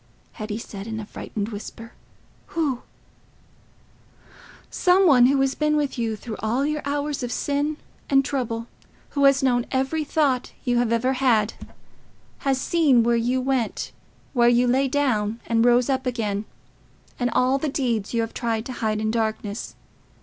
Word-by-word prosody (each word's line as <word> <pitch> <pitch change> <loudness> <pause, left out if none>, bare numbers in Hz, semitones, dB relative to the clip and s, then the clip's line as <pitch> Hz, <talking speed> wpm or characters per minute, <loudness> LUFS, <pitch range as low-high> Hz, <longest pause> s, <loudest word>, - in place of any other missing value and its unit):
Hetty 215 -1 -5
said, 205 -2 -8
in 220 -1 -4
a 215 - -6
frightened 210 0 -5
whisper, 225 +2 -8 0.6
"Who?" 280 -7 0 1.9
"Some 375 +1 +4
one 255 -7 +7
who 275 +1 +2
has 270 0 +2
been 300 +1 +1
with 290 -2 -1
you 225 -2 -1
through 215 +1 -7
all 235 +6 0
your 300 0 -1
hours 285 0 -2
of 245 -1 -3
sin 290 +3 -1 0.3
and 275 -1 +4
trouble—who 245 +2 -4
has 275 0 +5
known 245 -2 +2
every 270 +4 0
thought 285 -4 0
you 245 -1 +2
have 240 -2 +1
had—has 255 +1 -2
seen 280 -6 +3
where 235 +1 +3
you 245 +3 +1
went, 260 -3 -1 0.4
where 240 -2 +5
you 240 +1 +4
lay 260 +3 +2
down 235 -6 0
and 230 -1 +2
rose 245 0 +4
up 265 -1 0
again, 215 -4 -2 0.7
and 245 -1 +1
all 255 +3 +2
the 305 - -1
deeds 235 -7 -1
you 235 - +1
have 225 0 -4
tried 230 -2 -2
to 255 - -5
hide 215 -1 0
in 215 0 0
darkness. 220 -2 -3
245 Hz, 155 wpm, -24 LUFS, 225-275 Hz, 1.9 s, one